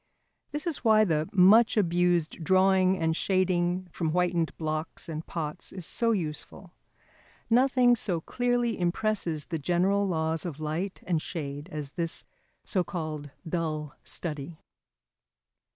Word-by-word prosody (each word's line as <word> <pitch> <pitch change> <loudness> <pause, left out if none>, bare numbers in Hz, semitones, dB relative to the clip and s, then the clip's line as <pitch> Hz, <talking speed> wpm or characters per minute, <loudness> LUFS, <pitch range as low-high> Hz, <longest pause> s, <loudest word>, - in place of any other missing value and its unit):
This 295 +2 -4
is 335 -4 -3
why 215 -2 +5
the 155 -4 0
much 210 +5 +6
abused 175 -3 +1
drawing 190 +1 +4
and 160 -1 0
shading 185 -1 +1
from 165 -1 -2
whitened 175 -1 0
blocks 155 +2 -3
and 160 -1 -5
pots 155 -3 -4
is 185 -3 -5
so 230 +7 +1
useful. 175 -1 -4 0.8
Nothing 250 0 +5
so 185 -7 -1
clearly 245 +4 0
impresses 175 -3 -1
the 165 -2 -4
general 185 +6 +2
laws 160 -2 -1
of 160 -5 -5
light 160 +5 -3
and 170 -4 0
shade 145 0 -5
as 150 -3 -5
this 165 0 -3 0.4
so 185 -4 0
called 155 -4 -5 0.2
dull 155 -3 -2
study. 155 -1 -4
175 Hz, 130 wpm, -28 LUFS, 160-195 Hz, 0.8 s, much